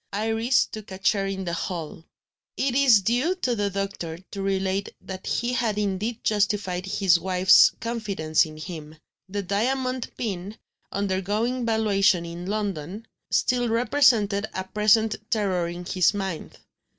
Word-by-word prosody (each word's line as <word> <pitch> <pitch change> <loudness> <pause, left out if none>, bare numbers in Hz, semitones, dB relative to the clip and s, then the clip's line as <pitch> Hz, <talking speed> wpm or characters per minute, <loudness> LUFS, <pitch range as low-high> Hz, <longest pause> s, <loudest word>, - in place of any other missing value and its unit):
Iris 225 +4 +2
took 215 -1 -9
a 190 - -7
chair 195 +1 +1
in 190 -1 -4
the 170 - -3
hall. 165 -2 -5 0.5
It 265 -1 0
is 250 -7 +5
due 250 - +1
to 255 -10 -1
the 205 -2 0
doctor 195 -4 -4
to 200 - -5
relate 195 0 -1
that 190 -1 -8
he 240 +1 -1
had 230 -4 0
indeed 210 +3 -2
justified 200 -3 0
his 190 -3 +3
wife's 185 +1 +6
confidence 205 -9 0
in 155 -1 -8
him. 155 -2 -8 0.3
The 200 +1 -3
diamond 255 +6 -1
pin, 200 -2 -4 0.3
undergoing 205 +6 -1
valuation 205 -5 +2
in 170 +2 -7
London, 200 -1 -3 0.2
still 245 -1 +1
represented 225 -4 +3
a 190 - -2
present 210 +3 +2
terror 190 -5 0
in 175 +1 -7
his 185 +2 +2
mind. 190 -5 -5
200 Hz, 140 wpm, -25 LUFS, 185-225 Hz, 0.5 s, wife's